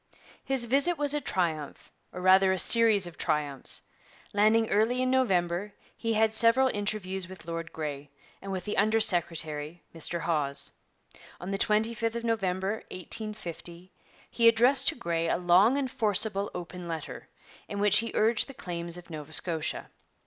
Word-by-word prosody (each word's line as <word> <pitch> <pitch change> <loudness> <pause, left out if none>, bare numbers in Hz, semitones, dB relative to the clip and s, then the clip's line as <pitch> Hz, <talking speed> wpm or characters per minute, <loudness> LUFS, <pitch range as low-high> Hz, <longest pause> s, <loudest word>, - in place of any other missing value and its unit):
His 265 -3 0
visit 280 +8 +2
was 290 -1 +1
a 295 - -1
triumph, 165 - -3 0.2
or 180 - -8
rather 190 +1 +5
a 190 - 0
series 220 -1 +4
of 175 -2 -10
triumphs. 150 -4 -3 0.5
Landing 215 +2 +3
early 225 +5 +2
in 255 - 0
November, 195 -6 0 0.2
he 230 -1 -2
had 220 0 +2
several 230 +4 +6
interviews 205 -3 -3
with 185 -3 -12
Lord 165 0 -5
Grey, 145 -2 -6 0.3
and 195 - -7
with 185 -1 -4
the 210 - -4
under 215 +2 +3
secretary, 165 -5 -1
Mr 165 +1 -2
Hawes. 150 -4 0 0.7
On 180 +2 -6
the 195 - -3
25th 225 +2 0
of 235 - -4
November 195 -2 -1
1850 185 -2 -5 0.4
he 230 -1 +2
addressed 250 +4 +4
to - - +3
Grey 170 -7 -2
a - - +1
long 180 +9 +4
and 265 -3 -2
forcible 210 -4 +1
open 180 0 -7
letter, 160 -2 -7 0.4
in 205 - -5
which 205 0 +4
he 230 - -3
urged 220 0 +3
the 275 - -11
claims 170 -7 -5
of 175 -1 -13
Nova 155 0 -8
Scotia. 160 -3 -2
195 Hz, 160 wpm, -28 LUFS, 170-225 Hz, 0.7 s, several